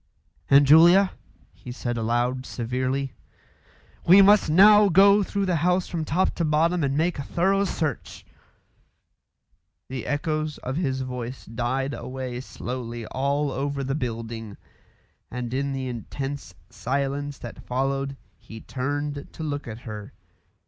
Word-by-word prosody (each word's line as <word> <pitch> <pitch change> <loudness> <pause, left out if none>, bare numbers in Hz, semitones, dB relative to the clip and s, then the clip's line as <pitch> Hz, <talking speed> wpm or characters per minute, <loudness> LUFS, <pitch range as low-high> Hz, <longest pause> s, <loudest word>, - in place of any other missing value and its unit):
"Aunt 140 0 +6
Julia," 175 +6 +7 0.4
he 105 +7 -10
said 120 -1 -3
aloud, 120 +3 0
severely, 130 +3 -2 0.9
"we 185 +4 +8
must 205 -3 +5
now 205 +5 +7
go 200 +3 +6
through 200 0 -1
the 180 -3 +1
house 180 +3 +1
from 165 -2 -3
top 175 +6 +1
to 170 - 0
bottom 165 +2 +2
and 140 0 0
make 165 0 0
a - - -1
thorough 195 +7 +1
search." 155 - -4 1.6
The 130 -2 -5
echoes 155 0 -2
of 130 +1 -5
his 135 -5 -1
voice 125 0 -6
died 125 +4 -2
away 130 -1 -5
slowly 120 -3 -6
all 140 +4 -1
over 140 +1 -2
the 135 +1 -2
building, 115 -5 -5 0.7
and 125 -1 -5
in 140 +1 -1
the 135 -1 -3
intense 135 +4 -6 0.2
silence 140 +2 -2
that 120 - -10
followed 135 +2 -1 0.2
he 110 - -11
turned 145 +3 -4
to 160 - -7
look 145 -3 -4
at 110 0 -7
her. 105 -3 -8
140 Hz, 135 wpm, -25 LUFS, 125-155 Hz, 1.6 s, we